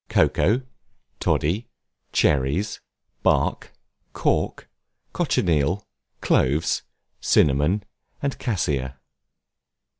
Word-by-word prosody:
COCOA, 120 +8 +3 0.6
TODDY, 95 +10 0 0.4
CHERRIES, 75 +9 +1 0.4
BARK, - - +1 0.4
CORK, - - 0 0.5
COCHINEAL, 85 +4 +1 0.4
CLOVES, 75 +6 +2 0.4
CINNAMON, 75 +8 +3 0.4
AND 140 -1 -3
CASSIA. 70 - -1
80 Hz, 60 wpm, -24 LUFS, 70-105 Hz, 0.6 s, COCOA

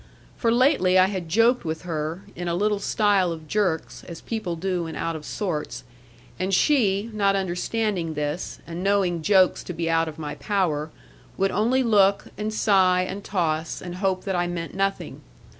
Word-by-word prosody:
For 230 - +1
lately 240 -7 +4
I 185 - +7
had 185 -4 -4
joked 230 +7 +3
with 160 +1 -4
her, 165 +1 -4
in 175 0 -5
a 170 - 0
little 210 +2 +1
style 200 -5 +2
of 160 -2 -7
jerks, 185 -4 -1
as 170 -2 -8
people 215 -7 -4
do 180 0 -2
when 160 - -6
out 165 0 -2
of 155 -1 -8
sorts; 175 -8 -4 0.6
and 185 +1 -1
she, 210 -2 +2
not 200 -2 +2
understanding 190 -2 -1
this, 150 +3 -3
and 170 +2 -6
knowing 195 -4 +1
jokes 185 +1 +3
to 180 - -5
be 165 0 -1
out 165 0 +2
of 155 0 -7
my 150 -2 -5
power, 165 -7 -1 0.5
would 195 0 +1
only 240 +6 +2
look, 200 -4 +3
and 210 +1 -3
sigh, 190 -4 +3
and 200 +1 -6
toss, 165 -4 -1
and 180 0 -7
hope 185 -1 0
that 195 -2 -2
I 175 0 +1
meant 170 -1 -5
nothing. 195 0 -2
185 Hz, 180 wpm, -24 LUFS, 165-205 Hz, 0.6 s, I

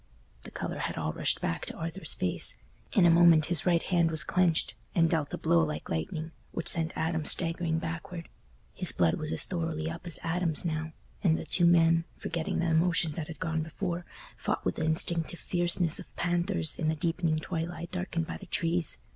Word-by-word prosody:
The - - -7
colour - - -5
had - - -3
all 80 -1 -2
rushed - - 0
back 85 - -2
to - - -5
Arthur's 165 +1 -4
face; 90 - 0 0.4
in 190 - +5
a 170 - +6
moment 165 -2 +6
his 155 0 +1
right 170 -2 +3
hand 170 -3 +2
was 160 -2 +1
clenched, 175 -9 +1 0.2
and 165 -1 +4
dealt 160 -3 -1
a - - -3
blow 85 -1 +3
like 75 -1 -4
lightning, 155 - -3 0.2
which 170 - +4
sent 165 -1 +3
Adam 160 -1 -1
staggering 165 0 +1
backward. 165 +1 -5 0.5
His - - +3
blood 85 -2 +1
was 155 0 -4
as - - +1
thoroughly 165 -3 -3
up 170 +2 -8
as 170 - -1
Adam's 165 -1 0
now, 160 -1 -3 0.3
and 165 -4 +3
the - - -6
two 175 -2 +2
men, 165 -1 +4
forgetting 165 -2 -3
the 170 -1 0
emotions 165 -1 +2
that 150 0 -5
had 165 - -9
gone 160 -3 -1
before, 170 +2 -4 0.3
fought - - -3
with - - -1
the 160 - -1
instinctive 165 +1 +2
fierceness 175 -2 +2
of - - -12
panthers 175 -2 +1
in 155 - 0
the 160 - +1
deepening 165 0 0
twilight 165 +1 -4
darkened 180 -2 -2
by - - -6
the 195 - -12
trees. 165 - 0
165 Hz, 195 wpm, -29 LUFS, 160-175 Hz, 0.5 s, a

